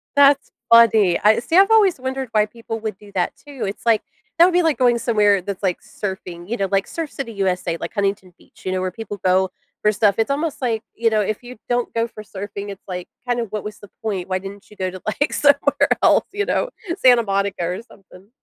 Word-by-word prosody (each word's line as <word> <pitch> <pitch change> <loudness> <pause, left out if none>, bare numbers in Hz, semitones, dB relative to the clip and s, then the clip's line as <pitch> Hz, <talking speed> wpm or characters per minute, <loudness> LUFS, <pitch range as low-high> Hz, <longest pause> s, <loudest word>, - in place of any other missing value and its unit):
That's 285 0 +5 0.2
funny. 220 -6 +6
I 215 +1 +4
see, 325 +9 0
I've 395 +3 +6
always 400 -9 +4
wondered 260 0 -4
why 215 -1 +3
people 225 0 -7
would 215 -3 -4
do 205 -1 -16
that 180 -2 0
too, 285 -3 -9
it's 200 +4 -6
like, 225 -2 +4 0.4
that 340 - +8
would 365 - +2
be 355 0 +3
like 320 -3 +2
going 245 -2 +3
somewhere 210 -4 +3
that's, 195 +1 -6
like, 185 -3 0
surfing, 185 -3 -6
you 235 - -2
know, 195 -5 -1
like 195 0 +1
Surf 325 -3 -5
City 235 -5 -6
USA- 185 -3 -1
like, - - -5
Huntington 195 -3 -2
Beach- - - -22
you 185 - -1
know, 185 - -1
where 185 0 -1
people 205 +1 -7
go 185 0 +3 0.3
for 210 - +3
stuff. 210 -1 +2
It's 225 +4 +1
almost 295 0 -2
like, 230 -3 0
you 230 0 +2
know, 215 -1 +1
if 210 +3 -2
you 245 0 -10
don't 245 0 -1
go 230 0 0
for 215 -1 -11
surfing, 200 0 -7
it's, 195 0 -8
like, 180 -1 -6 0.2
kind 245 -1 0
of 230 - -6
what 210 -1 -4
was 210 0 -7
the 205 - -13
point? 195 -5 -3
Why 185 0 0
didn't 195 +2 -10
you 210 - -15
go 185 -1 -1
to, 185 0 -9
like, 280 +7 -1
somewhere 285 0 +3
else, - - +5
you 410 +1 -1
know, - - 0 0.3
Santa 245 -2 +6
Monica 195 -3 -1
or 180 +4 -3
something? 195 -3 -18
215 Hz, 240 wpm, -21 LUFS, 195-245 Hz, 0.4 s, that